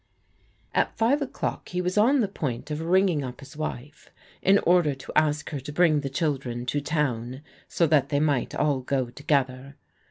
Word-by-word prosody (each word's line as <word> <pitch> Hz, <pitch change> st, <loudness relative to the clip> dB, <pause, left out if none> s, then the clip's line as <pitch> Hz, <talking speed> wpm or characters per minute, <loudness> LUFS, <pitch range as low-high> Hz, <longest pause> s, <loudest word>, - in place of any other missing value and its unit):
At -, -, 0 dB
five 240 Hz, +6 st, +2 dB
o'clock 275 Hz, -, -4 dB
he 180 Hz, -, -3 dB
was 180 Hz, 0 st, -1 dB
on 245 Hz, +6 st, +4 dB
the 210 Hz, -, +1 dB
point 150 Hz, -7 st, -4 dB
of 150 Hz, +1 st, -3 dB
ringing 175 Hz, -2 st, +2 dB
up 125 Hz, -1 st, -7 dB, 0.2 s
wife, 150 Hz, -1 st, -6 dB, 0.3 s
in 195 Hz, +1 st, +5 dB
order 170 Hz, -5 st, +4 dB
to 135 Hz, -, -10 dB
ask 150 Hz, 0 st, +1 dB
her 145 Hz, -, -3 dB
to 135 Hz, +3 st, -8 dB
bring 155 Hz, -1 st, +3 dB
the 140 Hz, -, -3 dB
children 135 Hz, -5 st, -2 dB
to 145 Hz, +4 st, -1 dB
toi 130 Hz, -4 st, -2 dB, 0.3 s
so 170 Hz, -, +1 dB
that 150 Hz, -3 st, +3 dB
they 145 Hz, -, +1 dB
might 145 Hz, -5 st, 0 dB
all 145 Hz, -3 st, +1 dB
go 130 Hz, -1 st, -2 dB
together. 135 Hz, 0 st, -1 dB
150 Hz, 180 wpm, -26 LUFS, 135-175 Hz, 0.3 s, in